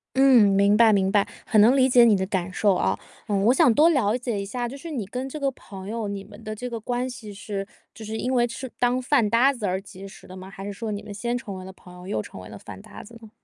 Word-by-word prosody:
嗯， 260 -5 +6
明 200 +1 +4
白， 225 0 +6
明 195 -2 +2
白， 205 -1 +2 0.2
很 215 -3 +4
能 245 +6 +5
理 260 0 +5
解 245 -2 +6
你 220 -3 +5
的 190 - -1
感 185 -1 -3
受， 205 +1 +2
啊。 95 - 0 0.3
嗯， 200 -2 0
我 240 - +5
想 250 - +5
多 315 +3 +6
了 240 -7 +2
解 235 -5 -3
一 - - -5
下， 240 +4 -3
就 250 - -8
是 305 +4 -9
你 245 -10 -4
跟 255 +6 -5
这 305 +3 -7
个 275 -1 0
朋 195 -6 -11
友， 225 0 -3
你 200 -1 -5
们 - - -15
的 215 0 -5
这 250 +3 -6
个 235 -2 -5
关 245 +3 -2
系 230 -4 -9
是 195 0 -6 0.3
就 220 - -11
是 220 +1 -5
因 255 +3 -2
为 240 -1 +3
就 235 - -8
是 260 - -6
当 245 +1 +2
饭 250 -4 +2
搭 250 +6 +4
子 220 -5 -4
而 185 +1 -1
结 195 0 -11
识 195 - -14
的 185 - -11
吗？ 190 +1 -10
还 195 0 -9
是 205 - -5
说 220 +2 -5
你 205 0 -5
们 205 - -8
先 235 +4 -2
成 200 -5 -7
为 185 - -9
了 190 - -9
朋 180 -1 -16
友， 180 +1 -12
又 110 - -2
成 - - -11
为 90 - -11
了 105 - -9
饭 95 -1 -11
搭 - - -12
子 230 +2 -15
呢？ 220 - -13
215 Hz, 320 characters per minute, -24 LUFS, 195-245 Hz, 0.3 s, 嗯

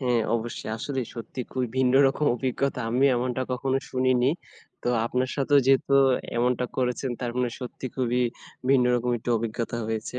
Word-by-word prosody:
হ্যাঁ 125 -3 +2
অবশ্যই। 115 -1 -5
আসলেই 130 +1 -3
সত্যি 115 +2 -6
খুবই 130 -1 -1
ভিন্ন 130 -1 +3
রকম 135 +3 0
অভিজ্ঞতা 130 +1 -1
আমি 125 +4 +2
এমনটা 125 +1 -1
কখনো 130 +1 0
শুনিনি। 130 0 +2 0.5
তো - - -1 0.2
আপনার 125 +2 -1
সাথেও 145 +1 +4
যেহেতু 135 +1 +3 0.4
এমনটা 125 +1 +1
করেছেন, 125 0 -1
তার 120 - -2
মানে 125 -1 +1
সত্যি 125 +1 -6
খুবই 125 -1 +1 0.5
ভিন্ন 130 -2 +5
রকম 125 0 0
একটু 120 - -4
অভিজ্ঞতা 115 +1 -3
হয়েছে। 110 +2 -3
125 Hz, 160 wpm, -26 LUFS, 120-130 Hz, 0.5 s, ভিন্ন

